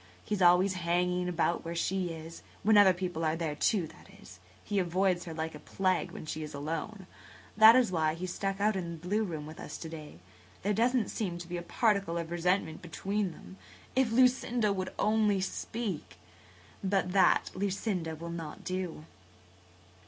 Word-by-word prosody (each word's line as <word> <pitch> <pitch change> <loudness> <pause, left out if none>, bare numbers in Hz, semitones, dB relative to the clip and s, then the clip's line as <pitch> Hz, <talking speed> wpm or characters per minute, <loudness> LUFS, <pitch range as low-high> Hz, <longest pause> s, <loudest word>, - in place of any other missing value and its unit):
He's 210 -2 -2
always 180 +2 +5
hanging 180 +1 +1
about 170 0 0
where 170 +1 -5
she 185 +1 0
is–when 165 +6 -2
other 205 -2 +8
people 180 -2 -3
are 155 0 +1
there, 165 -2 -2
too, 180 +4 +1
that - - -15
is. 90 +1 -14 0.2
He 205 -1 0
avoids 180 0 +1
her 165 - -6
like 160 0 -3
a 150 - -9
plague 185 +4 0
when - - -9
she 155 0 -4
is 150 -1 -6
alone. 165 +7 -4 0.5
That 220 +2 +9
was 250 -6 +4
why 160 -3 +1
he 170 - -8
was 180 -1 -3
stuck 195 0 -2
out 210 +1 +2
in 170 -3 -3
the - - -7
blue 210 +4 +1
room 160 -7 -4
with 155 +1 -10
us - - -7
to 160 - -7
day. 155 - -9 0.5
There 205 +2 +1
doesn't 235 +1 +2
seem 185 -6 -3
to 175 0 -8
be 175 0 -4
a - - -4
particle 200 -2 +1
of 170 0 -4
resentment 175 -1 0
between 195 +3 -2
them. 190 - -13 0.4
If 260 -3 +3
Lucinda 245 -3 +3
would 185 -1 -3
only 215 -2 +2
speak! 195 -1 -4 0.7
But 190 -2 +1
that 185 -2 +4
Lucinda 190 -4 -2
will 170 +2 -7
not 165 -3 -7
do." 180 -4 -4
180 Hz, 180 wpm, -31 LUFS, 165-200 Hz, 0.7 s, That